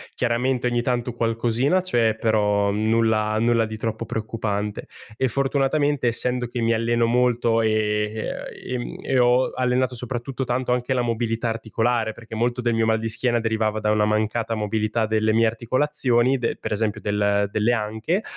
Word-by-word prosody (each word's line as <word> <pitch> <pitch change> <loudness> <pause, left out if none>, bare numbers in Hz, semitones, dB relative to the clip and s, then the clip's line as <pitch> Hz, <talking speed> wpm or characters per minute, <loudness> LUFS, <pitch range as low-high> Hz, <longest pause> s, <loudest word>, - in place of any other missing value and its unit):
Chiaramente 125 +1 0
ogni 120 -1 +1
tanto 125 0 -1
qualcosina 120 +7 +1
c'è, 120 -12 +1
però 105 -2 +2
nulla 110 0 +1
nulla 115 0 +2
di 110 0 -6
troppo 110 +1 -3
preoccupante 105 -2 -3 0.3
e 130 +3 0
fortunatamente 140 +1 +1
essendo 125 +1 -1
che 120 0 -5
mi 115 0 +2
alleno 115 +1 +1
molto 120 -1 +2
e 110 -1 +2 0.8
e 125 - -8
ehm, 120 -1 -4
e 135 - 0
ho 125 +1 +4
allenato 125 0 +1
soprattutto 125 +2 -4
tanto 125 0 0
anche 125 +1 -1
la 125 - +1
mobilità 115 0 -1
articolare, 115 0 -1
perché 115 0 -10
molto 120 +2 0
del 120 -1 0
mio 115 0 +2
mal 110 0 +2
di 115 - -3
schiena 120 +2 0
derivava 110 -1 0
da 105 0 +1
una 105 0 +2
mancata 110 +2 0
mobilità 110 +1 -1
delle 110 0 +1
mie 115 +1 +3
articolazioni 125 +2 +1
de 115 -2 -2
per - - -3
esempio 105 0 -1
del 100 0 +1
delle 110 +3 +1 0.2
anche, 170 - -1
115 Hz, 165 wpm, -23 LUFS, 110-125 Hz, 0.8 s, ho